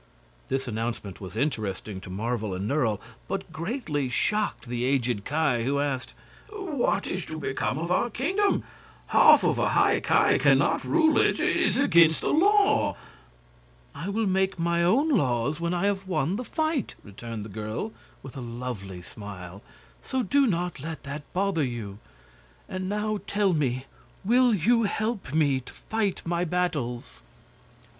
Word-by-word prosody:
This 135 0 -1
announcement 115 -4 -4
was 95 +3 -8
interesting 105 -7 -2
to - - -10
Marvel 110 +1 -2
and 95 +3 -3
Nerle, 125 -7 +1 0.3
but 190 -3 -4
greatly 160 - -2
shocked 130 - -1
the 120 0 -2
aged 125 -5 0
Ki, 145 -6 +1
who 140 +3 0
asked: 140 -3 -2 0.3
"What 385 - -1
is 185 -1 -3
to 160 - -6
become 130 -2 -2
of 170 +3 -3
our 235 +6 +2
kingdom? 375 - +1 0.5
Half - - +7
of - - +2
a - - +2
High - - +3
Ki - - +3
can - - +5
not - - +1
rule 315 -1 +3
it. - - +2
It - - +2
is - - +2
against 170 - +5
the - - 0
law." 405 +5 +3 1.0
"I 180 - -5
will 220 +2 0
make 190 0 +1
my 170 0 +1
own 245 - +3
laws 140 - +1
when 170 0 -1
I 180 +1 0
have 195 -1 -1
won 180 -1 0
the 245 - -3
fight," 315 - -1
returned 110 +1 -7
the - - -8
girl, 110 - -4 0.3
with 135 - -10
a 135 - -6
lovely 115 -7 -6
smile; 95 -2 -9 0.4
"so 260 -1 -2
do 275 +6 +3
not 175 -5 -1
let 160 +3 -6
that 145 +1 -7
bother 185 -4 +1
you. 110 -6 -5 0.7
And 185 0 -4
now 210 +1 -1
tell 200 -2 +2
me, 130 -4 0 0.4
will 245 +3 +4
you 230 +4 +3
help 215 - -2
me 145 -3 +2
to 130 - -12
fight 215 -3 -2
my 170 +1 0
battles?" 140 - -2
155 Hz, 160 wpm, -26 LUFS, -, 1.0 s, Half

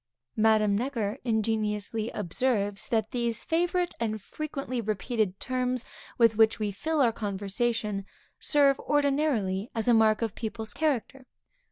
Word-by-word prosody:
Madame 215 -2 +4
Necker 235 -1 -2
ingeniously 220 -1 -1
observes 205 +1 -1
that 220 -2 0
these 235 -2 -1
favorite 350 +2 0
and 220 -2 -1
frequently 275 +2 -4
repeated 215 -2 -1
terms 255 -1 -1 0.3
with 230 -2 +5
which 220 0 +5
we 210 -2 -1
fill 310 +10 -1
our 240 -3 +4
conversation, 205 0 -2 0.3
serve, 280 -2 +4
ordinarily 275 -9 +1
as 225 0 -2
a 240 - +6
mark 220 0 +4
of 225 -3 -2
people's 220 -1 -5
character. 270 -3 -1
225 Hz, 130 wpm, -28 LUFS, 210-255 Hz, 0.3 s, a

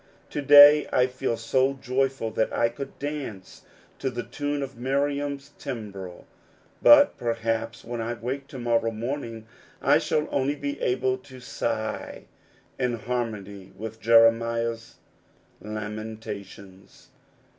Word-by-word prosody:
To 145 - -2
day 145 +1 +9
I 125 - +4
feel 125 -2 -2
so 130 +4 +1
joyful 130 -3 -1
that 110 - 0
I 115 - +2
could 135 +4 -8
dance 140 -10 -6 0.4
to 135 - -1
the 120 -1 -4
tune 145 0 -3
of 135 -1 -7
Miriam's 140 +2 -2
timbrel; 100 -8 -7 0.6
but 290 -1 +7
perhaps 115 0 -2
when 120 0 -4
I 115 +1 -3
wake 130 +5 -5
to 135 - -9
morrow 115 -2 +1
morning 115 0 -5 0.3
I - - +4
shall 150 0 0
only 140 +1 0
be 140 0 -5
able 130 +1 0
to 130 0 -14
sigh 125 - -4 0.6
in 125 -2 0
harnony 105 -5 -4
with 110 +1 -7
Jeremiah's 115 0 +3 0.7
lamentations. 105 -2 -8
120 Hz, 125 wpm, -26 LUFS, 110-135 Hz, 0.7 s, day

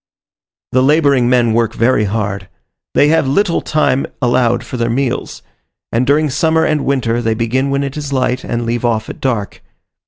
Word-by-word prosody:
The 130 - +3
labouring 140 -3 +3
men 120 -3 +3
work 115 0 0
very 115 -2 +2
hard. 100 -2 -3 0.5
They 145 - +4
have 160 -3 +2
little 170 +5 +1
time 150 -3 0
allowed 120 -1 +1
for - - -8
their 120 -1 -1
meals, 125 +1 -2 0.5
and 120 +3 0
during 150 +2 +3
summer 160 +3 +2
and 155 -1 0
winter 120 -4 0
they 115 -1 0
begin 125 +4 -1
when 140 0 0
it 140 +1 -5
is 145 -2 -5
light, 130 -1 0
and 120 0 -3
leave 120 +1 -2
off 115 -2 -1
at - - -13
dark. 115 -7 -2
125 Hz, 180 wpm, -15 LUFS, 115-140 Hz, 0.5 s, They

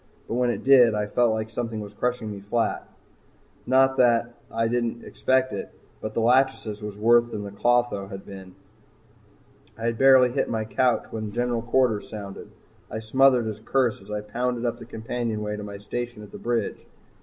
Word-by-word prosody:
But - - -4
when 125 0 +1
it - - -3
did, 125 -5 +6
I 105 0 0
felt 120 +3 +2
like 110 0 -3
something 115 -1 -3
was 105 -1 -8
crushing 120 -1 -2
me 100 - -7
flat. 110 +4 -1 0.8
Not 135 +1 +4
that 120 -1 +3 0.2
I 115 0 0
didn't 120 0 -1
expect 130 -3 +1
it, 100 - -5 0.3
but 110 - -5
the - - +1
"Lachesis" 120 -3 +2
was 105 -1 -6
worse 120 +2 +4
than 105 -3 -5
the 100 - -7
"Clotho" 120 -2 +1
had 95 -1 -8
ever - - -24
been. 95 -1 -11 1.2
I 115 - -8
had 115 -1 -1
barely 130 -2 +6
hit - - -1
my 110 -1 -1
couch 125 +2 +1
when 110 -2 -4
General 120 0 -1
Quarters 120 -3 +1
sounded. 100 -3 -8 0.4
I - - -5
smothered 125 +1 +3
a 105 -1 -5
curse 120 -2 0
as 100 - -16
I 105 0 -3
pounded 120 +3 -2
up 120 - -2
the - - -9
companionway 110 -2 -3
to 105 - -6
my 100 -1 -7
station 120 +2 -5
at 100 - -13
the - - -9
bridge. 120 -3 -2
115 Hz, 190 wpm, -25 LUFS, 105-120 Hz, 1.2 s, did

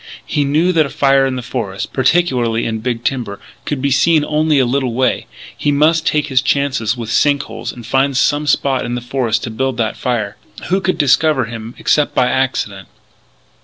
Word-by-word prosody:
He 145 - 0
knew 155 +6 +2
that 160 -3 +3
a - - -10
fire 135 -1 +3
in 130 - -2
the 125 - -5
forest, 105 -6 -4
particularly 130 -6 +1
in 110 -1 -2
big 120 0 -3
timber, 120 -6 -2 0.3
could 140 -3 -3
be 140 - +1
seen 155 +3 +3
only 155 0 +1
a 130 - +4
little 125 -1 -1
way. 130 0 0 0.3
He 145 - 0
must 155 +3 +2
take 150 -1 +1
his 130 -3 +1
chances 130 -4 0
with 115 -2 -5
sink 140 +3 +2
holes - - -6
and 120 -2 -11
find 135 +2 +1
some 145 +2 +1
spot 140 -2 +1
in 120 - -3
the 125 - -4
forest 120 -2 -1
to 115 - -4
build 130 +2 -2
that 110 -2 -1
fire. 110 -5 -2 0.3
Who 190 +2 +1
could 185 0 0
discover 145 -1 +3
him 115 +1 -8
except 150 -1 +1
by 125 -1 +3
accident? 105 -8 -2
130 Hz, 200 wpm, -16 LUFS, 120-145 Hz, 0.3 s, a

